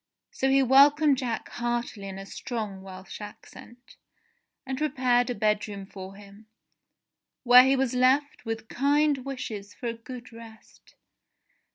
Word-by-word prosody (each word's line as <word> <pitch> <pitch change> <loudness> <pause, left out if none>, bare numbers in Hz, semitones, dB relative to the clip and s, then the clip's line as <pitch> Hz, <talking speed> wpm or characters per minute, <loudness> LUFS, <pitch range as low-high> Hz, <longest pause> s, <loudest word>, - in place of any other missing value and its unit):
So 265 - -1
he 270 0 +4
welcomed 280 +2 +5
Jack 240 -4 -3
heartily 240 -4 -3
in 190 -1 -7
a 195 - -8
strong 210 -3 -6
Welsh 190 +1 -10
accent, 235 +3 -13 0.7
and 265 0 -3
prepared 255 -4 +1
a 245 - -2
bedroom 210 -2 -1
for 190 0 -10
him, 205 +1 -15 1.0
where 250 0 +8
he 270 +1 +3
was 265 -2 0
left 260 +4 +2
with 225 -1 -5
kind 285 +3 +2
wishes 230 -7 -7
for - - -10
a 230 - -1
good 240 +1 -11
rest. 225 -1 -15
240 Hz, 140 wpm, -27 LUFS, 210-265 Hz, 1.0 s, where